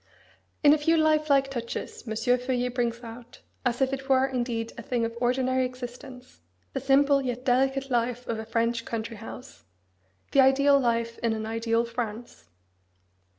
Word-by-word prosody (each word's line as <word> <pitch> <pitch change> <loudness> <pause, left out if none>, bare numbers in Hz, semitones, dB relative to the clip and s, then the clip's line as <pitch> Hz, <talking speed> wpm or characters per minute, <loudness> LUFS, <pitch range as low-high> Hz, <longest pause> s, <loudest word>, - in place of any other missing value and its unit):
In 290 0 +8
a 305 - +2
few 325 +3 +3
life 310 -1 +2
like 275 -1 +3
touches 235 -2 -5
M. 220 - -3
Feuillet 250 +1 0
brings 240 -1 -1
out, 235 +1 -11 0.2
as 245 +1 +1
if 265 0 0
it 270 0 -5
were 265 0 +4
indeed 240 -3 -3
a - - -7
thing 235 0 -1
of 230 0 -5
ordinary 255 +1 +1
existence, 250 - -8 0.3
the - - -1
simple 275 +1 +4
yet 250 -1 -4
delicate 270 +2 +1
life 245 0 0
of 225 -1 -3
a 220 - -6
French 230 0 0
country 230 -1 -5
house, 225 +4 -10 0.7
the 275 - +6
ideal 280 +1 +5
life 230 -2 -1
in 230 -1 0
an 220 0 -4
ideal 230 +1 0
France. 230 - -6
245 Hz, 165 wpm, -27 LUFS, 230-270 Hz, 0.7 s, In